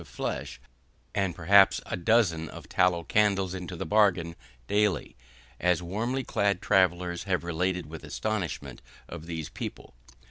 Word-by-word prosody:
of 85 - -14
flesh, 65 - -5 0.5
and 95 -3 0
perhaps 95 +4 +5
a - - -3
dozen 85 -4 +2
of - - -10
tallow 90 -2 +2
candles 95 -1 +2
into 90 -1 -6
the - - -4
bargain, 90 -4 +2 0.3
daily, 105 +4 0 0.4
as 90 -1 +2
warmly 115 +9 -2
clad 100 -5 0
travellers 90 -3 +1
have 90 -3 0
related 90 +1 -1
with 80 +1 -9
astonishment 85 - -4 0.3
of 80 - -9
these 80 -3 -5
people. - - -7
90 Hz, 140 wpm, -28 LUFS, 85-100 Hz, 0.5 s, perhaps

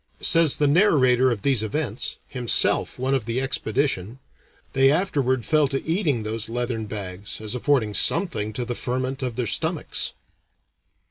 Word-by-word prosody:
Says 165 -3 +5
the 150 - +1
narrator 135 - +4
of 115 -5 -3
these 135 -5 +2
events, 115 +1 -3
himself 125 -3 +1
one 130 +2 -1
of 130 -5 0
the 115 +2 -2
expedition, 130 -4 -2 0.6
"They 135 0 +4
afterward 140 - 0
fell 155 +1 +3
to 135 0 -4
eating 160 - 0
those 110 +1 -3
leathern 120 -2 -3
bags, 100 -1 -6
as 110 0 -4
affording 125 -4 0
something 110 - +1
to 120 +3 -3
the 120 - -3
ferment 130 +2 -3
of 125 -3 -3
their 125 0 -2
stomachs." - - -1
125 Hz, 150 wpm, -23 LUFS, 110-140 Hz, 0.6 s, Says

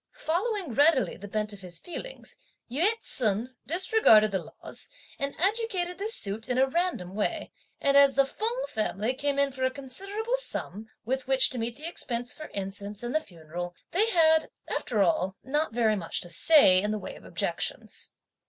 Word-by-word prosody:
Following 390 - -1
readily 290 +1 +3
the 205 - -9
bent 210 +1 -2
of 200 - -11
his 175 -2 -4
feelings, - - -8 0.4
Yü 325 - +3
ts'un 235 +2 -1
disregarded 330 - +5
the 190 -2 -1
laws, - - -6 0.3
and 280 0 -3
adjudicated 380 -2 0
this 435 +3 -1
suit 215 +4 0
in 250 - 0
a 265 - +5
random 270 - -2
way; 305 - -2 0.3
and 280 0 +2
as 280 -1 +6
the 275 0 +5
Feng 460 - -2
family 215 +1 -1
came 280 +1 -1
in 280 0 +2
for 260 0 -5
a 260 - +3
considerable 395 - -2
sum, 220 - -3 0.2
with 260 +2 -2
which 265 -1 +5
to 250 - -3
meet 230 +1 -3
the 305 +5 -7
expense 245 -7 -2
for 310 - -8
incense 200 +2 -5
and 240 - -3
the 310 - +3
funeral, 175 - -7 0.2
they 425 +6 +2
had, 320 -5 +4 0.2
after 215 -5 0
all, 185 +1 +1
not 295 +2 -1
very 225 -2 +2
much 170 -5 -3
to 175 - -6
say 185 - +6
(in 210 - -1
the 215 - -1
way - - -7
of - - -14
objections.) - - -2
260 Hz, 180 wpm, -28 LUFS, 210-335 Hz, 0.4 s, as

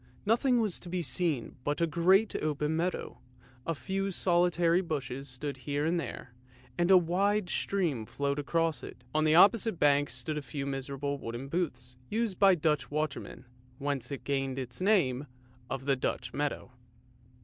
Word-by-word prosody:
Nothing 240 +3 +3
was 215 -6 0
to 175 - -9
be 180 0 -1
seen 140 -2 -1
but 145 0 -1
a 170 - +3
great 185 +6 +3
open 150 0 -1
meadow, 175 +3 -2 0.5
a 165 - 0
few 195 +5 -2
solitary 175 -1 +2
bushes 140 -5 -4
stood 135 +3 -5
here 145 +3 -2
and 170 +2 +1
there, 130 -5 -7 0.4
and 175 +1 +1
a 190 - +9
wide 185 +3 +1
stream 160 - -1
flowed 140 0 -2
across 165 -1 0
it. - - -10
On 155 0 +2
the 155 0 +4
opposite 205 +3 +5
bank 145 0 +4
stood 150 +5 -3
a - - -7
few 140 0 -5
miserable 140 +1 -3
wooden 120 +3 -6
booths 130 -7 -3
used 220 -3 -1
by 195 -2 +7
the 165 - -11
Dutch 150 -4 +1
watermen, 150 -2 -3 0.3
whence 140 -3 -2
it 140 - -5
gained 135 -2 -1
its 125 +1 -5
name 150 -10 +2 0.4
of 135 0 -4
the 140 -1 +3
Dutch 125 -1 -3
meadow. 145 -3 -2
150 Hz, 170 wpm, -30 LUFS, 140-180 Hz, 0.5 s, a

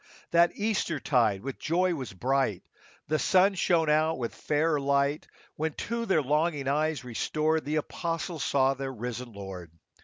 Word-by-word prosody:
That 170 0 +4
Easter 205 -7 -1
tide 115 -9 +2
with 135 -1 -5
joy 180 +3 +1
was 135 -7 -5
bright, 125 -1 0 0.4
The 155 0 +1
sun 190 +2 +4
shone 170 -3 +2
out 155 +2 +2
with 120 -2 -3
fairer 150 0 0
light, 140 +1 +1 0.3
When, 160 0 -1
to 230 +6 -3
their 160 -6 +3
longing 150 0 0
eyes 150 -1 0
restored, 155 +6 -1
The 150 +2 -1
apostles 165 +1 -3
saw 135 -1 +3
their 135 0 -5
risen 125 0 -5
Lord. 95 -4 -8
150 Hz, 155 wpm, -28 LUFS, 130-165 Hz, 0.4 s, That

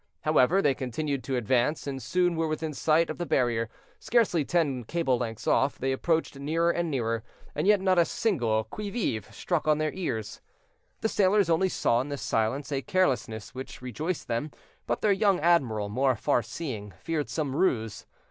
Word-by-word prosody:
However, 155 +5 +3
they 145 - +4
continued 135 +2 -3
to 135 - -1
advance, 125 +5 +1
and 135 -2 -4
soon 175 +7 +1
were 165 0 0
within 155 0 -3
sight 160 +3 +2
of 155 - -8
the 175 - -1
barrier, 115 -3 +1 0.3
scarcely 215 -9 +2
ten 140 -6 0
cable 130 -2 0
lengths 115 -2 -4
off; 135 +1 +2
they 135 +1 -1
approached 160 +3 0
nearer 165 +4 +1
and 170 -1 -1
nearer, 115 -5 -1 0.3
and - - -1
yet 210 -1 +6
not 185 -1 +3
a 170 - +5
single 145 - 0
"qui 210 - -6
vive!" 155 - -2
struck 170 -4 -2
on 155 -1 +4
their 155 0 -1
ears. 110 - -4 0.6
The 220 - +1
sailors 195 -3 +3
only 185 +4 +3
saw 120 -8 +1
in 140 - -6
this 140 -5 -4
silence 120 +7 -1
a 135 -1 0
carelessness 125 - 0
which 130 0 -8
rejoiced 155 - -3
them; 120 +6 -2 0.4
but - - -1
their 210 - +3
young 195 -1 +3
admiral, 130 -11 +2
more 130 +5 +1
far 120 - +1
seeing, 110 - -6
feared 160 -3 -2
some 145 -4 -2
ruse. 115 - 0
145 Hz, 185 wpm, -28 LUFS, 120-170 Hz, 0.6 s, yet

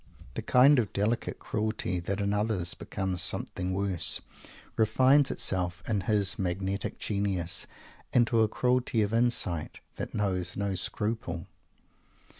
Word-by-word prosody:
The - - -4
kind 135 +2 +5
of 110 -5 -1
delicate 105 +4 -1
cruelty, 110 -4 -2
that 95 +4 -3
in 100 0 0
others 105 -4 0
becomes 95 -2 -3
something 90 +1 +1
worse, 95 -2 +1 0.6
refines 130 +5 +4
itself 90 -1 0
in 105 -3 0
his 100 -1 +1
magnetic 95 +2 -2
genius 100 -3 -1 0.4
into 120 -2 +3
a 110 - +4
cruelty 125 -1 +1
of 105 +1 -2
insight 115 -9 0 0.2
that - - -5
knows 95 -4 -1
no 100 -1 -1
scruple. 95 -2 -1
100 Hz, 125 wpm, -29 LUFS, 95-110 Hz, 0.6 s, kind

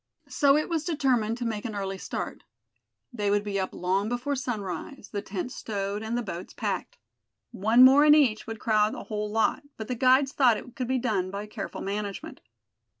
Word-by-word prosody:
So 280 -1 +4
it 305 - 0
was 330 -3 -1
determined 255 -9 +1
to 245 - -4
make 220 -2 -3
an 220 -3 -5
early 195 -1 -3
start. - - -5 0.7
They 205 -4 -1
would 205 0 +2
be 200 -1 -2
up 190 - -2
long 190 +4 -1
before 245 +4 -2
sunrise, 220 - -5
the 205 - -3
tents 200 +7 -5
stowed, 200 -1 -3
and 220 +2 -2
the 245 - -2
boats 180 -4 -7
packed. 200 -4 -3 0.5
One 225 +6 +6
more 275 +3 +7
in 300 0 +7
each 245 -9 +2
would 225 0 -5
crowd 215 -1 +2
a - - -7
whole 210 -1 -3
lot, 225 +7 +1 0.2
but 220 - -6
the 250 - -2
guides 260 +3 +4
thought 250 -6 +4
it 245 +2 -10
could 250 -2 -3
be 260 +1 +1
done 215 -7 -1
by 200 +2 -5
careful 210 -1 -6
management. 200 0 -5
220 Hz, 200 wpm, -27 LUFS, 205-255 Hz, 0.7 s, more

